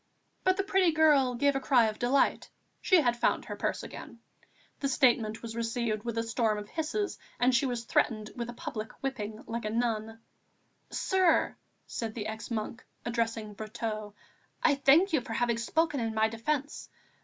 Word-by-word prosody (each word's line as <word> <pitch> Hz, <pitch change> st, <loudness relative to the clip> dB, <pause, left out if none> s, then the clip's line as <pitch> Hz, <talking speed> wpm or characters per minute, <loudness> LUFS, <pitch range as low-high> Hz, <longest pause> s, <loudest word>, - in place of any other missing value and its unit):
But 370 Hz, 0 st, +3 dB
the 390 Hz, -, +1 dB
pretty 385 Hz, -3 st, +3 dB
girl 295 Hz, -5 st, +4 dB
gave 280 Hz, +3 st, +2 dB
a -, -, +1 dB
cry 255 Hz, -3 st, +4 dB
of 215 Hz, -1 st, -2 dB
delight; 255 Hz, +3 st, +2 dB, 0.3 s
she 365 Hz, -3 st, +5 dB
had 240 Hz, -4 st, +2 dB
found 240 Hz, -, +1 dB
her -, -, -5 dB
purse -, -, -2 dB
again. -, -, -9 dB, 0.6 s
The 275 Hz, -, -1 dB
statement 235 Hz, -5 st, +2 dB
was 225 Hz, -1 st, -6 dB
received 230 Hz, -2 st, -1 dB
with 235 Hz, 0 st, -4 dB
a 230 Hz, -, +1 dB
storm 230 Hz, -2 st, 0 dB
of 210 Hz, 0 st, -7 dB
hisses, 330 Hz, +6 st, -2 dB, 0.2 s
and 250 Hz, +1 st, +4 dB
she 250 Hz, +2 st, +3 dB
was 240 Hz, -2 st, -3 dB
threatened 215 Hz, -2 st, 0 dB
with 235 Hz, -1 st, -4 dB
a -, -, -5 dB
public 220 Hz, -1 st, -5 dB
whipping, 220 Hz, -5 st, -4 dB
like 230 Hz, 0 st, -4 dB
a -, -, 0 dB
Nun. 225 Hz, -1 st, -1 dB, 0.7 s
"Sir," 375 Hz, -3 st, +2 dB, 0.3 s
said 225 Hz, -2 st, -5 dB
the 215 Hz, -3 st, -4 dB
ex 220 Hz, +1 st, -5 dB
monk, 230 Hz, +1 st, -4 dB, 0.2 s
addressing 230 Hz, -2 st, -2 dB
Brotteaux, 215 Hz, -1 st, -5 dB, 0.5 s
"I 300 Hz, -, +5 dB
thank 290 Hz, +7 st, +4 dB
you 300 Hz, -, +3 dB
for 230 Hz, -, -6 dB
having 235 Hz, 0 st, +1 dB
spoken 320 Hz, +5 st, +1 dB
in 225 Hz, -2 st, -2 dB
my 220 Hz, 0 st, +3 dB
defence. 280 Hz, +6 st, -3 dB
235 Hz, 180 wpm, -30 LUFS, 220-275 Hz, 0.7 s, she